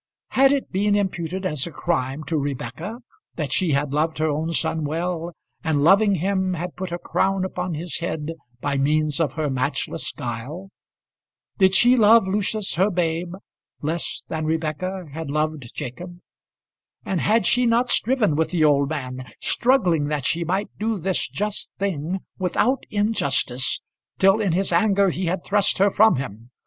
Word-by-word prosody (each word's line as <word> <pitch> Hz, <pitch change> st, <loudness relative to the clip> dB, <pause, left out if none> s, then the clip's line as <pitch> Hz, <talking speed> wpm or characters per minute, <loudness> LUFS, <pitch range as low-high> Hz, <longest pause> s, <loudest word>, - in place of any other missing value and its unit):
Had 270 Hz, +1 st, +4 dB
it 280 Hz, -1 st, -1 dB
been 205 Hz, +2 st, +2 dB
imputed 190 Hz, -2 st, -2 dB
as 150 Hz, -6 st, 0 dB
a -, -, -7 dB
crime 150 Hz, -4 st, -2 dB
to 165 Hz, -, -2 dB
Rebekah 150 Hz, -, -4 dB, 0.3 s
that 150 Hz, -5 st, -3 dB
she 175 Hz, -5 st, +1 dB
had 140 Hz, 0 st, 0 dB
loved 155 Hz, +2 st, 0 dB
her 155 Hz, +1 st, +1 dB
own 155 Hz, +3 st, -2 dB
son 160 Hz, -1 st, 0 dB
well, 165 Hz, +3 st, -2 dB, 0.3 s
and 155 Hz, -4 st, +1 dB
loving 200 Hz, +4 st, +5 dB
him 190 Hz, +1 st, 0 dB
had 175 Hz, +1 st, -5 dB
put 185 Hz, -1 st, -5 dB
a 175 Hz, -, -2 dB
crown 190 Hz, +1 st, 0 dB
upon 180 Hz, -2 st, -3 dB
his 170 Hz, +3 st, -4 dB
head 160 Hz, -2 st, -3 dB, 0.3 s
by 140 Hz, -1 st, -1 dB
means 150 Hz, +1 st, +1 dB
of 160 Hz, -4 st, +1 dB
her 155 Hz, -1 st, -1 dB
matchless 130 Hz, -2 st, -2 dB
guile? 135 Hz, +11 st, -6 dB, 0.9 s
Did 190 Hz, -1 st, +5 dB
she 245 Hz, +6 st, +6 dB
love 225 Hz, -2 st, +6 dB
Lucius, 205 Hz, +1 st, 0 dB
her 190 Hz, +5 st, +2 dB
babe, 170 Hz, -1 st, -1 dB, 0.5 s
less 160 Hz, +3 st, -2 dB
than 160 Hz, -1 st, -3 dB
Rebekah 160 Hz, +3 st, -2 dB
had 160 Hz, -1 st, -5 dB
loved 150 Hz, -4 st, -2 dB
Jacob? 175 Hz, +8 st, -6 dB, 0.9 s
And 185 Hz, -3 st, -1 dB
had 220 Hz, -1 st, +2 dB
she 245 Hz, +5 st, +3 dB
not 235 Hz, +2 st, +2 dB
striven 225 Hz, -, +2 dB
with 160 Hz, +1 st, +1 dB
the 170 Hz, -3 st, +1 dB
old 140 Hz, -2 st, +3 dB
man, 130 Hz, -4 st, -5 dB
struggling 180 Hz, -, +2 dB
that 145 Hz, -3 st, -2 dB
she 170 Hz, +5 st, +1 dB
might 190 Hz, +5 st, -2 dB
do 220 Hz, 0 st, 0 dB
this 190 Hz, +1 st, -1 dB
just 210 Hz, 0 st, -3 dB
thing 185 Hz, -1 st, -2 dB, 0.2 s
without 220 Hz, +8 st, +1 dB
injustice, 140 Hz, -, +1 dB, 0.4 s
till 195 Hz, +3 st, +4 dB
in 195 Hz, -5 st, +1 dB
his 185 Hz, 0 st, +1 dB
anger 195 Hz, +1 st, +3 dB
he 185 Hz, +2 st, -3 dB
had 175 Hz, +1 st, -1 dB
thrust 200 Hz, 0 st, +1 dB
her 200 Hz, +1 st, +4 dB
from 220 Hz, +3 st, +5 dB
him. 120 Hz, -3 st, -6 dB
175 Hz, 165 wpm, -23 LUFS, 150-195 Hz, 0.9 s, she